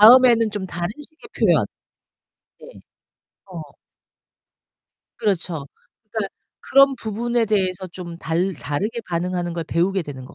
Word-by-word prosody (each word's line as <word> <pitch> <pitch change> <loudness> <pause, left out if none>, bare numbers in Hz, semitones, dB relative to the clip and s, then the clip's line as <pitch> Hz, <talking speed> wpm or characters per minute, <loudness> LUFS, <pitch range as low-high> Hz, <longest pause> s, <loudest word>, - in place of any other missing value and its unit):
다음에는 230 0 +8
좀 205 -2 -4
다른 175 -1 -3
식의 315 +8 -11
표현. - - +4 0.9
네. - - -12 0.6
어. 180 -4 -8 1.6
그렇죠. 175 -8 -1 0.5
그니까 215 -3 -1 0.3
그런 275 0 +5
부분에 235 +2 0
대해서 190 -3 0
좀 170 -1 -8
달 175 +4 0
다르게 170 - -2
반응하는 175 0 -1
걸 170 -1 -3
배우게 180 +4 +1
되는 130 -4 -8
것 - - -13
190 Hz, 250 characters per minute, -22 LUFS, 170-225 Hz, 1.6 s, 다음에는